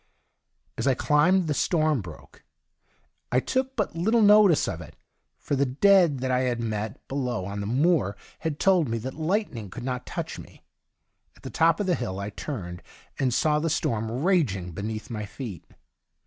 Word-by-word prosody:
As - - 0
I 135 - +4
climbed, 170 +8 +3
the 155 - 0
storm 155 -3 +1
broke. 85 -5 -13 0.9
I 125 - +4
took 260 - -1
but 210 -6 -2
little 220 +7 +2
notice 205 -5 +6
of 85 -3 -4
it, 75 - -12 0.4
for 145 - -2
the 140 0 +1
dead 170 0 +4
that 130 0 -1
I 125 - +2
had 125 -2 0
met 110 -2 -4
below 125 -7 -2
on 100 +1 -5
the 100 - -4
moor 130 - +2 0.2
had 160 -2 -3
told 180 -8 +3
me 115 - -1
that 130 +4 -5
lightning 160 - -2
could 120 +6 -8
not 125 -1 -4
touch - - -5
me. - - -14 0.7
At - - -22
the - - -7
top 165 0 +3
of 205 - 0
the 185 - +2
hill 95 - -3
I 100 +1 -4
turned, 90 - -6 0.4
and 130 -2 +1
saw 150 +5 +2
the 165 +2 -1
storm 115 -7 -1
raging 120 - +1
beneath 110 +6 -5
my 105 -2 -4
feet. 105 - -8
130 Hz, 180 wpm, -26 LUFS, 110-165 Hz, 0.9 s, notice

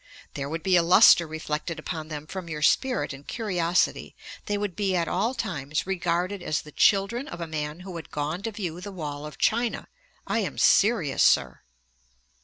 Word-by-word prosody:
There 140 -1 -4
would 160 +1 -4
be 190 -1 +3
a - - +5
lustre 170 0 +7
reflected 155 +1 -4
upon 155 0 -5
them 150 -1 -6
from 180 +1 -7
your 150 -1 -4
spirit 250 - +2
and 135 +1 -12
curiosity. 180 -6 0 0.3
They 205 - 0
would 205 -4 -3
be 195 -3 0
at 170 -2 0
all 225 +10 0
times 150 - -3
regarded 185 +1 -1
as 155 -3 -2
the 150 - -12
children 205 - +2
of 175 - -8
a 170 - -3
man 155 +1 -5
who 185 -1 -8
had 165 - -9
gone 150 +5 -3
to 225 +2 -3
view 180 -5 -5
the 200 +2 -7
wall 150 -5 -6
of 150 - -11
China. 235 +1 0 0.4
I - - 0
am - - -3
serious, 195 - +3
Sir."' - - +3
175 Hz, 190 wpm, -26 LUFS, 155-195 Hz, 0.4 s, lustre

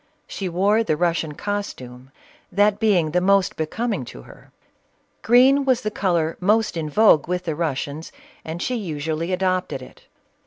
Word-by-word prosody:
She 190 -2 -5
wore 200 +6 +2
the 155 -8 -1
Russian 165 -2 0
costume, 130 -12 -6 0.4
that 205 +1 +2
being 185 -8 +2
the 180 +2 +1
most 195 0 +2
be 155 - -2
coming 220 - -2
to - - -11
her; - - -17 0.7
green 260 +4 +5
was 260 -2 +1
the 215 - -3
color 170 -6 0
most 210 +3 +1
in 160 -2 -3
vogue 180 -4 +4
with 180 0 -2
the 165 -3 -2
Russians, 150 -1 -4 0.3
and 165 +3 -5
she 255 - -2
usually 160 -5 -3
adopted 185 -5 -1
it. - - -16
180 Hz, 160 wpm, -22 LUFS, 160-210 Hz, 0.7 s, green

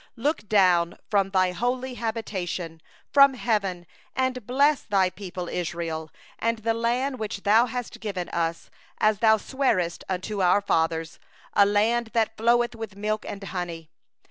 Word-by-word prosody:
15Look 275 -3 -1 0.4
forth - - -17
from 200 -2 +3
Thy 185 -1 +2
holy 250 +6 -2
habitation, 190 -8 -4 0.3
from 275 -1 +7
heaven, 200 -7 -1 0.3
and 255 -3 -1
bless 280 +3 +3
Thy 190 -3 +1
people 180 -3 -6
Israel, 165 -2 -3 0.3
and 230 0 0
the 225 +1 0
land 245 +3 -1
which 215 -2 -4
Thou 220 +4 +5
hast 245 0 -5
given 195 -5 -4
us, 165 0 -2 0.3
as 215 -1 +2
Thou 220 -1 +5
didst - - -12
swear 260 -10 +2 0.2
unto 190 +2 -2
our 180 +2 +4
fathers, 160 -3 0 0.3
a 200 -1 +5
land 225 +3 +1 0.2
flowing 240 +1 +3
with 220 -3 -7
milk 215 +1 -2
and 200 0 -7
honey. 170 -4 -5
210 Hz, 145 wpm, -25 LUFS, 180-235 Hz, 0.4 s, from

